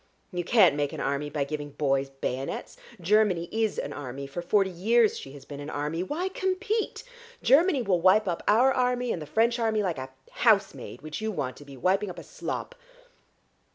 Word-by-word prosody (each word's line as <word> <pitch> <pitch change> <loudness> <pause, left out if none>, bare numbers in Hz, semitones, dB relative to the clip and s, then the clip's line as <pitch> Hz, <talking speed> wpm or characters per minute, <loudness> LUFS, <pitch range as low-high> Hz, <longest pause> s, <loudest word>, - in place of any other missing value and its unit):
You 175 0 -1
can't 185 -5 +5
make 145 -1 -1
an - - -6
army 140 +2 -1
by 145 -1 -1
giving 145 0 -5
boys 135 -2 0
bayonets. 135 -1 -4 0.2
Germany 185 -2 +2
is 220 -1 0
an - - -3
army, 140 0 -6
for 140 +5 -5
forty 195 +2 +2
years 220 +5 +3
she 135 - -8
has 145 - -12
been 145 -1 -8
an 145 +1 -6
army. 150 +3 -2
Why 305 - -2
compete? 395 +4 -2 0.4
Germany 280 +2 +4
will 185 -5 +1
wipe 195 +4 +5
up 170 -2 -1
our 250 +6 +5
army 250 -1 +1
and 165 - -3
the 150 - -7
French 230 - +2
army 220 -2 +1
like 175 -7 -2
a 130 0 -6 0.2
housemaid, 200 - +1
which 155 +5 -6
you 220 0 -1
want 130 -10 -3
to 145 - -12
be, 140 -1 -11
wiping 195 +7 +1
up 180 - -8
a - - -8
slop. - - -5
185 Hz, 195 wpm, -27 LUFS, 145-225 Hz, 0.4 s, can't